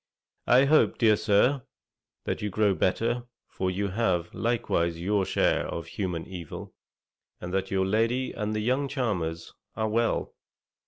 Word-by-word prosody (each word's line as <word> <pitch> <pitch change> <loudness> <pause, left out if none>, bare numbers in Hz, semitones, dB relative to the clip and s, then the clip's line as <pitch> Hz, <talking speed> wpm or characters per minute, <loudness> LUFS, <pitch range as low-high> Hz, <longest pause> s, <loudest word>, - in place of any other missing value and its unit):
I 130 +3 +6
hope, 155 +2 +4
dear 110 -3 +5
Sir, 115 +7 +3 0.6
that - - -2
you 105 - -1
grow 105 0 +2
better, 115 +6 0 0.3
for 95 - -1
you 100 +2 -1
have 95 -5 0
likewise 85 -8 0
your 100 +2 +1
share - - +1
of 85 - -5
human 90 -5 -4
evil, 90 -5 -8 0.7
and 90 0 -6
that 95 0 -1
your 95 -1 +1
lady 115 +6 +1
and 105 0 -3
the 105 - -1
young 130 +5 +1
charmers 95 - -2 0.2
are 110 - 0
well. 115 +1 0
105 Hz, 150 wpm, -27 LUFS, 95-115 Hz, 0.7 s, I